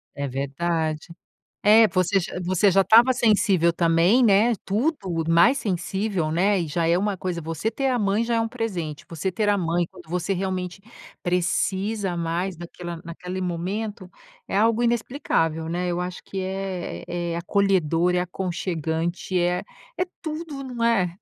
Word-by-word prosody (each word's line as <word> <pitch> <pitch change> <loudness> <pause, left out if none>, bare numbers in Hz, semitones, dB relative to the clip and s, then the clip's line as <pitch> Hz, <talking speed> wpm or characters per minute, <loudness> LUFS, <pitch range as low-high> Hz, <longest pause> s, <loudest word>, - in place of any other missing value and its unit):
É 140 0 -3
verdade. 155 +4 -2 0.6
É, 215 +1 +7
você 190 +1 +2
já 180 0 -5
você 185 +2 +3
já 195 +1 +5
estava 230 +7 +6
sensível 200 -8 +3
também, 170 +8 +3
né. 220 +3 +5
Tudo 195 - -1
mais 170 +12 +5
sensível, 190 -3 -1
né. 190 +4 +2
E 165 - -2
já 165 +2 0
é 170 - +3
uma 205 +1 0
coisa, 180 -2 -3
você 165 +6 -2
ter 270 +3 -2
a 250 -1 +1
mãe 205 +2 +1
já 235 0 0
é - - +2
um 225 - -1
presente, 185 -11 -4
você 170 +3 -3
ter 210 +3 -1
a 205 -1 +3
mãe, 170 0 0
quando 175 -4 -15
você 180 +2 -1
realmente 185 0 -3 0.4
precisa 190 +2 0
mais 170 +2 -2
naquela 175 0 -7
naquele 180 +2 -6
momento, 185 +3 -3 0.4
é - - -1
algo 225 +2 +3
inexplicável, 215 - 0
né, 180 +2 -1
eu 175 0 -1
acho 180 0 -5
que 195 - -6
é 185 - -4
é 175 -1 -3
acolhedor, 180 -2 +2
é 180 - +2
aconchegante, 175 -1 -2
é 175 +1 +1 0.4
é - - +4 0.2
tudo, 310 -3 -5
não 245 -3 -4
é? 195 -7 +2
185 Hz, 160 wpm, -24 LUFS, 170-210 Hz, 0.6 s, É